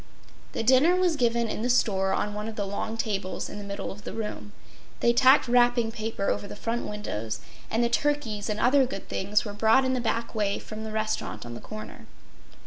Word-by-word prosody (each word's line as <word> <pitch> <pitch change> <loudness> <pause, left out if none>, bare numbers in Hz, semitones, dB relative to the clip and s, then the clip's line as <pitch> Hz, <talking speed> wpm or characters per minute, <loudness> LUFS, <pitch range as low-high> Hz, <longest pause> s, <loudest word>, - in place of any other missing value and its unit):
The - - -2
dinner 265 +9 +5
was 365 -3 +2
given 235 -3 +1
in 215 - -3
the 245 - 0
store 195 -6 +2
on 210 - -1
one 210 +1 -4
of 225 - -6
the 205 - -2
long 205 +3 -3
tables 200 -4 -2
in - - -7
the - - -6
middle 200 0 -5
of 205 +1 -11
the - - -6
room. 210 -2 -5 0.5
They 235 - +4
tacked 260 +3 +6
wrapping 240 -1 +3
paper 220 -2 -3
over 200 - -3
the - - -8
front 230 +3 -2
windows; 115 - -4 0.3
and 230 +2 +1
the - - +4
turkeys 235 -5 0
and 210 0 -1
other 260 +3 +4
good 220 -6 -7
things 205 +3 0
were 205 - -5
brought 225 +5 +4
in 260 - +1
the 255 - 0
back 230 0 -1
way 205 -3 0
from 215 0 -7
the 220 - -5
restaurant 215 - -2
on 120 - -7
the 120 - -8
corner. 215 0 -9
220 Hz, 220 wpm, -27 LUFS, 205-240 Hz, 0.5 s, tacked